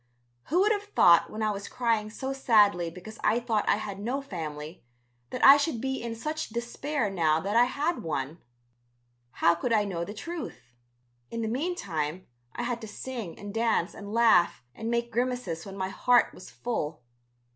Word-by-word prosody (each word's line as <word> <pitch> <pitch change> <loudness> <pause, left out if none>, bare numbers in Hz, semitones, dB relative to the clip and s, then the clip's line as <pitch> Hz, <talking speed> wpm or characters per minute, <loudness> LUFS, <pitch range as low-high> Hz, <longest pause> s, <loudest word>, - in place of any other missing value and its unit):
Who 350 +6 +2
would 420 +2 +4
have 410 -1 0
thought 170 -1 +6
when 220 +1 -4
I 215 - +2
was 200 -1 -5
crying 225 -3 0
so 265 +5 -4
sadly 205 -9 +4
because 185 +6 -11
I 225 +3 +3
thought 230 -3 0
I - - +5
had 205 -2 -5
no 245 +7 -2
family 160 - -7 0.5
that - - +1
I 275 +1 +11
should 290 -4 -1
be 265 +2 -2
in 230 -1 -4
such 305 +7 -4
despair 240 +1 -2
now 160 -4 +2
that 200 +4 -2
I 240 +1 +7
had 295 +7 -1
one. 150 0 -3 0.9
How 170 - +3
could 170 +8 -3
I 215 -2 +4
know 175 -4 -3
the 205 +5 -7
truth? 215 - -7 0.6
In 230 0 -3
the - - -1
meantime 195 - -2 0.3
I - - -3
had 240 -1 -2
to 220 - -7
sing 230 -5 -6
and 205 -1 -8
dance 225 -5 +1
and 200 -1 -9
laugh 195 - +4
and 225 +1 -5
make 235 0 -1
grimaces 240 -7 -2
when 195 0 -8
my 190 0 -2
heart 245 +5 +3
was - - -12
full. 155 - -4
220 Hz, 185 wpm, -28 LUFS, 180-245 Hz, 0.9 s, I